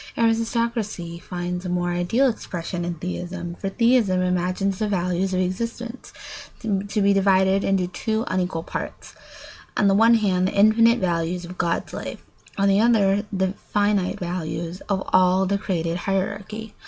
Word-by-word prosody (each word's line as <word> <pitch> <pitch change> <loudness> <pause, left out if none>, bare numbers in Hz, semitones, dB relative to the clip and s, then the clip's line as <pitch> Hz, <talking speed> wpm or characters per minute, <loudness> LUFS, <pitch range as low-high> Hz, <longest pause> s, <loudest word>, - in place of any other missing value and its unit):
Aristocracy 225 -6 0
finds 180 0 -4
a 180 - -4
more 175 0 0
ideal 175 +10 +2
expression 180 -6 -4
in 175 0 -3
theism; 175 +1 -5
for 195 +3 -4
theism 230 -3 +3
imagines 185 +2 0
the 215 - 0
values 180 -1 0
of 185 - 0
existence 230 +6 -4 0.5
to 205 -1 -1
be 200 0 +4
divided 195 0 +3
into 195 -2 +1
two 220 +5 -2
unequal 180 -3 -1
parts: - - -6 0.6
on 205 - +4
the 195 - +4
one 225 +3 +6
hand 185 -4 +2
the - - -3
infinite 225 +3 +5
value 175 -3 0
of 180 +1 -11
God's 170 0 -1
life, - - -6 0.3
on 200 0 +2
the 195 0 +4
other 205 -3 +3
the 190 -1 0 0.2
finite 205 -2 +1
values 175 0 -4
of 190 -1 0
all 185 +1 +4
the 200 +1 0
created 170 -4 -2
hierarchy. 200 +3 -3
190 Hz, 155 wpm, -23 LUFS, 180-210 Hz, 0.6 s, one